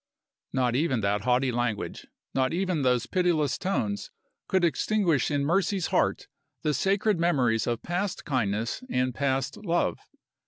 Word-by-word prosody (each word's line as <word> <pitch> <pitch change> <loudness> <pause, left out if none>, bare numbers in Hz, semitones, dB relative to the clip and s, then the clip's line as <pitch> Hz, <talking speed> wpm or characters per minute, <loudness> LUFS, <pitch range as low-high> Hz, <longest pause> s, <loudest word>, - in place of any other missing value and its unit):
Not 125 -2 +1
even 130 -5 +1
that 100 +1 0
haughty 125 +1 +2
language, 120 -3 -2 0.3
not 130 +2 +1
even 180 -3 0
those 125 -2 +2
pitiless 170 -3 +1
tones, 110 - -2 0.4
could 190 -1 +1
extinguish 170 - +1
in 145 -1 0
Mercy's 190 +3 +1
heart - - +1 0.4
the 150 - +1
sacred 195 +2 +1
memories 130 -10 +2
of 120 -1 -2
past 180 +2 -2
kindness 115 - -1
and 125 - 0
past 135 0 -1
love. 175 -4 0
140 Hz, 135 wpm, -27 LUFS, 120-175 Hz, 0.4 s, haughty